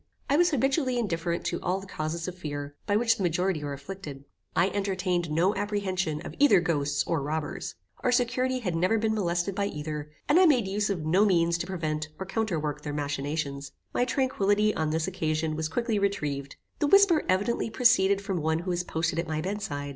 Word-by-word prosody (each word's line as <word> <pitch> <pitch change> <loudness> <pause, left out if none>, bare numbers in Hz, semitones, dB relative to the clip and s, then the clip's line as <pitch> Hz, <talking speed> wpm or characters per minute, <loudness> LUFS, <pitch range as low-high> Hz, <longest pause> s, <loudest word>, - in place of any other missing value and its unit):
I - - +5
was 350 +3 +5
habitually 270 -2 +1
indifferent 170 -6 -1
to 170 - -2
all 185 +2 0
the 195 - -10
causes 165 -2 -4
of 185 - -5
fear, 145 -4 -5
by 205 - +2
which 225 +1 +3
the - - -5
majority 180 -2 0
are 145 - -3
afflicted. 140 -1 -8 0.3
I 190 - +3
entertained 185 -3 -1
no 170 +6 +2
apprehension 190 -7 -1
of - - -7
either 285 -9 +6
ghosts 145 -4 0
or 165 -3 0
robbers. 150 +1 -3 0.2
Our 250 - +1
security 255 +1 +1
had 180 -7 -2
never 185 +7 +2
been 220 0 +1
molested 175 -2 0
by 200 +1 0
either, 150 -2 -5 0.2
and 295 +5 +5
I 370 - +7
made 250 -10 +3
use 205 +2 0
of 175 -6 -2
no 180 +6 +4
means 170 -4 +3
to - - -3
prevent 155 -4 -2
or 190 - -5
counterwork 165 -8 -2
their 150 -1 -5
machinations. 145 -1 -3 0.2
My - - +2
tranquillity, 215 -5 +2
on 155 -1 -1
this 160 +2 0
occasion, 160 -3 -1
was 155 0 -2
quickly 230 +2 0
retrieved. 145 -9 -2 0.2
The 295 - +2
whisper 390 -2 +6
evidently 205 +5 +1
proceeded 200 -5 +4
from 195 -4 -2
one 160 +1 +1
who 175 +2 -3
was 175 0 -1
posted 165 -1 -1
at 170 - -2
my 155 -1 -2
bed 195 +6 -3
side. 145 -6 -4
180 Hz, 200 wpm, -28 LUFS, 155-210 Hz, 0.3 s, I